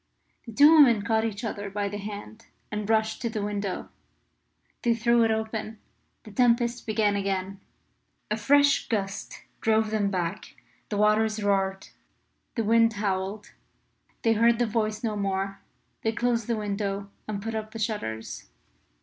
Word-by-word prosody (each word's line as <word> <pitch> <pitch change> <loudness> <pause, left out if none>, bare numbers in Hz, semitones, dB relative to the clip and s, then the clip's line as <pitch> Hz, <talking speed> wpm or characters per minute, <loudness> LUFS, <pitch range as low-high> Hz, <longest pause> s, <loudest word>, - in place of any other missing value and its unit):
The - - -6
two 290 +7 +7
women 245 -10 +6
caught 220 +1 +1
each 210 -1 -4
other 205 -2 -4
by 200 +1 -2
the 205 +1 -5
hand 210 +2 -8 0.2
and 210 0 -3
rushed 220 0 +1
to 235 - -1
the 215 -2 -3
window. 205 -2 -3 0.9
They 235 -1 +2
threw 235 +1 +3
it 225 - +3
open; 220 0 -2 0.5
the 215 - -12
tempest 235 +2 +2
began 210 -2 +2
again; 195 -1 -2 0.7
a - - +3
fresh 285 +6 +3
gust 195 -3 -3 0.2
drove 220 -1 +2
them 210 -2 +1
back; 185 +1 -3 0.3
the 205 - -2
waters 215 +1 +2
roared: 195 -1 0 0.7
the 230 - 0
wind 230 +1 +4
howled; 200 0 -3 0.7
they 225 - +4
heard 230 +1 +4
the 240 - +2
voice 215 0 -1
no 220 -2 -1
more. 195 -1 -2 0.4
They 225 - 0
closed 235 -1 0
the 235 -2 0
window 200 -1 -3 0.2
and 210 -2 -3
put 225 +2 -4
up 215 -1 -4
the 225 - -8
shutters. 205 - -4
215 Hz, 155 wpm, -27 LUFS, 200-225 Hz, 0.9 s, two